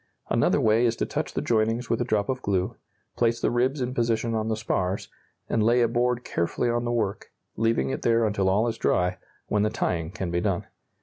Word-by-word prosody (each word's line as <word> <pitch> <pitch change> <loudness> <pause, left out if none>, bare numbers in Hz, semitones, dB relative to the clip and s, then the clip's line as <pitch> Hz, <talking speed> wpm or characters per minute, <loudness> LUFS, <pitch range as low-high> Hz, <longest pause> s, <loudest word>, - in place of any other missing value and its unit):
Another - - +3
way 110 +2 +4
is 115 - 0
to - - -1
touch - - -3
the - - -1
joinings 115 +2 +1
with 115 - 0
a - - +3
drop 110 -4 0
of 130 -1 -2
glue, 95 -2 -1 0.4
place 115 -1 +1
the - - +1
ribs 130 +4 +1
in 125 0 -2
position 115 -1 0
on 110 -1 -1
the 110 - 0
spars, 95 -3 -2 0.4
and 110 - +1
lay 120 +3 +4
a - - +4
board 120 +1 0
carefully 100 +8 -1
on 120 0 -1
the 120 - -1
work, 110 -4 -2 0.2
leaving 115 +3 +1
it - - -3
there 115 -1 +3
until 100 -3 +1
all 105 +5 +2
is 115 - -3
dry, 90 0 +1 0.3
when 105 - 0
the 105 - +2
tying 85 -7 -1
can 90 -1 -4
be 85 0 0
done. - - -1
115 Hz, 225 wpm, -26 LUFS, 105-120 Hz, 0.4 s, way